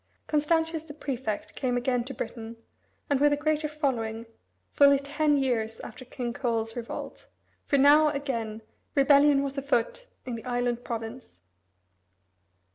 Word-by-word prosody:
Constantius 320 +1 +1
the 295 -2 -11
prefect 255 -8 -4
came 250 -2 -1
again 245 0 0
to 265 - -7
Britain, 225 0 -6 0.5
and 285 -2 +1
with 290 +1 +4
a - - +1
greater 305 +1 0
following, 235 -7 -2 0.5
fully 280 -1 +6
ten 290 +1 +1
years 230 -5 -1
after - - -9
King 245 -1 -4
Coel's 225 -3 -2
revolt, 235 -2 -7 0.4
for 280 - +3
now, 290 +3 +6
again, 235 -7 -3 0.3
rebellion 280 0 +5
was 275 0 -3
afoot - - -1 0.2
in 250 - -4
the 230 - -6
island 245 -1 -1
province. 225 - -7
270 Hz, 135 wpm, -27 LUFS, 235-290 Hz, 0.5 s, fully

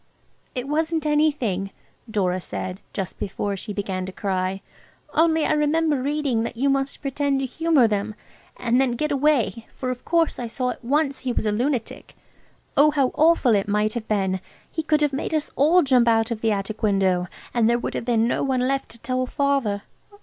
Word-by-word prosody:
"It 250 +1 -3
wasn't 320 +1 0
anything," 285 -11 +1 0.4
Dora 185 -4 0
said, 185 +1 -5
just 190 -2 -5
before 200 +1 -2
she 210 +3 -6
began 195 -2 -3
to - - -5
cry, 190 -1 -2 0.5
"only 320 -1 +3
I - - +2
remember 300 -1 +2
reading 280 -4 0
that 230 - -4
you 275 +3 +2
must 275 +1 -2
pretend 275 0 0
to 270 - -1
humour 310 -2 +3
them, 210 0 -2 0.4
and 245 +1 +2
then 260 -3 +1
get 300 +5 -1
away, 265 -7 +1
for 255 -1 -2
of 250 - -6
course 335 -1 +1
I 240 - -3
saw 250 +2 -2
at - - -10
once 280 +2 +1
he 260 - -2
was 235 - -1
a 210 - +2
lunatic. 240 +2 -2 0.6
Oh, 295 +2 +6
how 280 -4 +2
awful 315 -6 +4
it 200 -1 +1
might 210 +1 +1
have 235 -2 -5
been! 190 -3 0 0.3
He 320 - -2
could 305 -1 +1
have 295 -2 +2
made 300 +3 -2
us 305 - -2
all 325 +6 +5
jump 255 -4 +4
out 225 0 +3
of 225 -2 -3
the 225 - +2
attic 205 +1 -3
window, 190 -4 +2 0.3
and 230 -2 +3
there 235 - +3
would 240 - -4
have - - -3
been 230 -2 +2
no - - 0
one 255 -2 +1
left 275 0 -1
to 235 - -12
tell 255 +1 -2
Father. 270 -8 0
250 Hz, 200 wpm, -23 LUFS, 210-290 Hz, 0.6 s, Oh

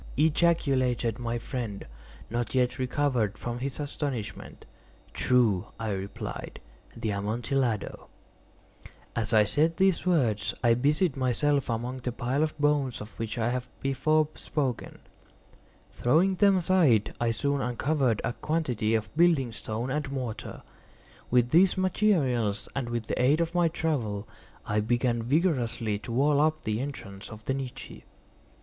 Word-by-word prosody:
ejaculated 135 -7 +2
my 120 0 -2
friend, 115 -4 -5 0.5
not 120 +1 -2
yet 125 0 +1
recovered 125 -5 0
from 120 0 -4
his 135 +2 -4
astonishment. 135 -8 -5 0.5
"True," 115 -8 +2
I 110 -2 -2
replied; 95 0 -5 0.4
"the 110 - -2
Amontillado." 115 +3 -2 1.1
As 110 -2 -1
I 110 -2 +6
said 155 +10 +1
these 190 -2 +3
words 120 - +1
I 120 -1 +5
busied 145 +6 +2
myself 135 +2 +1
among 120 +3 -2
the 125 -1 -3
pile 125 +3 -1
of 155 0 -1
bones 145 -4 +1
of 105 +1 -8
which 115 0 -3
I 115 0 +1
have 125 0 -3
before 150 +3 +2
spoken. 135 -6 -3 0.9
Throwing 165 +10 +3
them 195 0 +4
aside, 165 - +3
I 120 - +2
soon 140 +4 0
uncovered 125 -1 0
a 120 - -1
quantity 125 -5 -1
of 110 +3 -3
building 160 -7 +3
stone 110 +3 -4
and 145 -1 -2
mortar. 125 -5 -5 0.7
With 125 0 +3
these 180 +3 +5
materials 150 - +1
and 130 -3 -2
with 120 -1 -2
the - - -1
aid 140 +5 +4
of 170 0 0
my 175 -1 +3
trowel, 125 -11 -2 0.4
I 105 0 0
began 120 +2 +1
vigorously 120 - 0
to 115 - -8
wall 140 +4 +3
up 155 0 +1
the 110 0 -1
entrance 105 -8 -7
of 105 -1 -11
the 135 - 0
niche. 135 -2 -6
125 Hz, 140 wpm, -28 LUFS, 115-150 Hz, 1.1 s, I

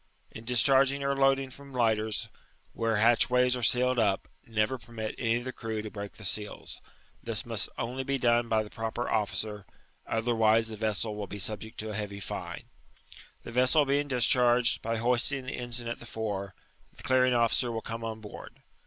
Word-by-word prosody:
In 110 - -10
discharging 135 +3 +4
or 140 0 +1
loadb^ 135 0 +4
^m 135 +1 -12
lighters, 110 -3 +1 0.5
where 115 -1 0
hatchways 125 +3 +4
are 125 - -4
sealed 125 +2 +3
up, 100 -3 +1 0.2
never 110 +3 0
permit 115 -2 -6
any 115 -1 +2
of 120 - -2
the 130 0 -5
crew 110 -2 -4
to 110 - -6
break 100 -1 -6
4he 110 - -10
seals: 105 +2 -3 0.4
this - - -3
must - - -2
oidv 125 +3 -3
be 140 0 +1
done 120 -1 +2
by 110 -1 +2
the 105 - -12
proper 115 +2 -3
officer, 105 -1 -1 0.4
other 115 +2 0
wise 110 0 +3
the 110 - -6
vessel 110 0 -1
will 105 -1 -5
be 105 - -7
subject 110 +2 -4
to 110 0 -5
a - - -5
heavy 100 -1 -4
fine. 100 - -5 0.8
The - - -8
vessel 130 +5 +4
being 140 +1 +1
discharged, 125 -1 +3
by 115 0 -1
hoisting 125 +3 +2
the 130 - -4
eataga 120 -1 -5
at - - -5
tiie 120 - -9
fore, 100 -4 -4 0.4
<ihe - - -13
clearing 130 -1 +3
officer 120 +1 +2
will 115 -1 -3
come 115 0 -6
on 110 -1 -5
board. 105 - -11
115 Hz, 190 wpm, -29 LUFS, 110-125 Hz, 0.8 s, discharging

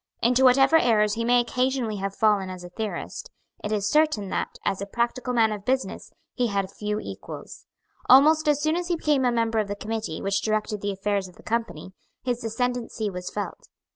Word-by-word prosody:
Into 250 +2 +4
whatever 270 +4 +6
errors 215 -6 +3
he 230 - -2
may 245 +1 +4
occasionally 250 -2 0
have 195 0 -4
fallen 205 -3 +2
as 185 -1 -8
a 175 - -9
theorist, 215 +4 -5 0.3
it 210 - -3
is 205 -2 0
certain 300 -7 +2
that, - - -3
as 195 -1 0
a 200 - -4
practical 240 +3 -1
man 225 -3 +3
of 205 -2 -5
business, 260 +4 -2 0.2
he 245 -2 0
had 195 -2 -2
few 210 +1 -3
equals. - - -9 0.4
Almost 305 +4 +6
as 295 -1 +3
soon 310 +1 +2
as 350 0 -2
he 350 - +1
became 295 -5 +1
a 245 - +3
member 230 -1 +1
of 210 - 0
the 205 - -3
committee 220 -5 -4
which 195 0 0
directed 215 -1 -1
the 205 - -1
affairs 200 0 -1
of 180 - -16
the - - -17
Company, 225 -7 -3 0.3
his 245 -2 -2
ascendency 230 -2 -2
was 180 -1 -5
felt. 205 -1 -6
225 Hz, 200 wpm, -25 LUFS, 205-250 Hz, 0.4 s, whatever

